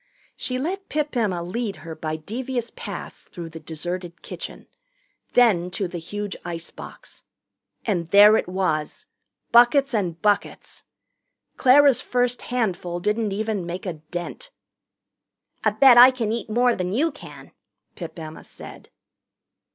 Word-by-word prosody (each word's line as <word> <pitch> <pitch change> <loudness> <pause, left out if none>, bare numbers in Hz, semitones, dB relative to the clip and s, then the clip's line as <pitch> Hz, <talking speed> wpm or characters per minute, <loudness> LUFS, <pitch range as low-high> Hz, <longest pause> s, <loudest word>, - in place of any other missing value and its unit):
She 255 - -2
let 370 +9 -4
Pip 300 -2 -2
Emma 195 -8 0
lead 205 +4 -3
her 165 - -6
by 155 0 -4
devious 240 +8 -4
paths - - -7
through 170 -2 -7
the 160 0 -9
deserted 170 +3 -6
kitchen. - - -8 0.7
Then 205 -8 +4
to 190 +1 -3
the 175 0 -6
huge 205 +4 -5
icebox. 170 -1 -8 0.6
And 175 -7 -1
there 205 +3 +8
it - - 0
was 180 -5 -2 0.5
buckets 245 +3 +5
and 180 -6 -1
buckets! 205 -1 -1 0.7
Clara's 275 0 +5
first 245 0 0
handful 185 -8 -2
didn't 210 +3 0
even 210 -1 -2
make 175 +3 -6
a 180 - -2
dent. 175 - -7 1.1
"I - - +4
bet 260 -3 +7
I 250 +1 +11
can 240 -5 -2
eat 230 0 -3
more 245 +2 +3
than 180 0 -3
you 310 +8 +1
can," 290 - -13 0.4
Pip - - -8
Emma 160 -1 -8
said. - - -12
205 Hz, 135 wpm, -23 LUFS, 175-245 Hz, 1.1 s, I